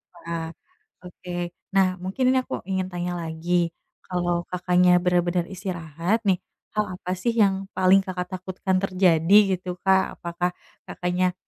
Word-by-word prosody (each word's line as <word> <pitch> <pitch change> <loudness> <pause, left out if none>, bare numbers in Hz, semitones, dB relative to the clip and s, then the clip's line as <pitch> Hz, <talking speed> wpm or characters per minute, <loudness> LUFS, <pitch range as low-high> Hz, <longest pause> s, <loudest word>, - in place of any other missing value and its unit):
Wah, 170 -1 -5 0.6
oke. 180 0 -10 0.4
Nah, 195 -1 +5 0.2
mungkin 195 +8 -2
ini 260 - +3
aku - - -8 0.2
ingin 190 -1 0
tanya 175 0 -3
lagi, 170 +1 0 0.4
kalau 175 -1 0
Kakaknya 180 0 +3
bener-bener 175 -1 +2
istirahat 175 +1 -2
nih, 185 -2 +3 0.4
hal 210 0 +2
apa 180 0 -6
sih, 235 - +1
yang 195 -2 +2
paling 190 +1 +5
Kakak 180 -1 -4
takutkan 185 +1 -2
terjadi, 185 -1 +3 0.2
gitu 180 +1 -9
Kak? 190 -1 +2
Apakah 175 +1 -2 0.4
Kakaknya, 180 0 0
180 Hz, 135 wpm, -24 LUFS, 175-190 Hz, 0.6 s, Nah